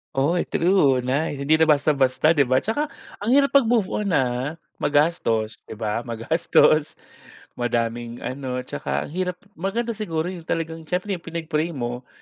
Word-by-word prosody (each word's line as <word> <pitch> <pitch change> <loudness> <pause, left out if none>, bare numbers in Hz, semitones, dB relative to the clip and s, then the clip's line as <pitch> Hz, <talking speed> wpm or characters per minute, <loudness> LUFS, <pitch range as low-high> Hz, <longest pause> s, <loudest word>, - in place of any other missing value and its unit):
Oy 155 +6 +1
true, 145 -8 +3
nice 140 +2 -1
hindi 155 +3 +3
na 160 - +5
basta-basta 145 -1 +3
'di 145 -5 +3
ba, 130 +2 +2
'tsaka 290 +8 -1 0.3
ang 205 - -2
hirap 280 0 +4
mag 245 - -1
move 225 -4 +2
on 210 - -1
ah, 130 +2 0 0.2
magastos 145 -8 +1
'di - - -7
ba 105 +1 -2
magastos, 155 +5 +2 0.6
madaming 120 0 -2
ano 130 -1 -4
'tsaka - - -3
ang - - -9
hirap, 180 +1 -2 0.2
maganda 225 +7 -2
siguro 175 -5 -2
yung 170 -3 -9
talagang 165 0 -3
siyempre 185 +4 -2
yung 175 - -11
pinag 165 -1 -5
pray 155 +3 +1
mo, 120 0 -4
155 Hz, 160 wpm, -23 LUFS, 125-175 Hz, 0.6 s, na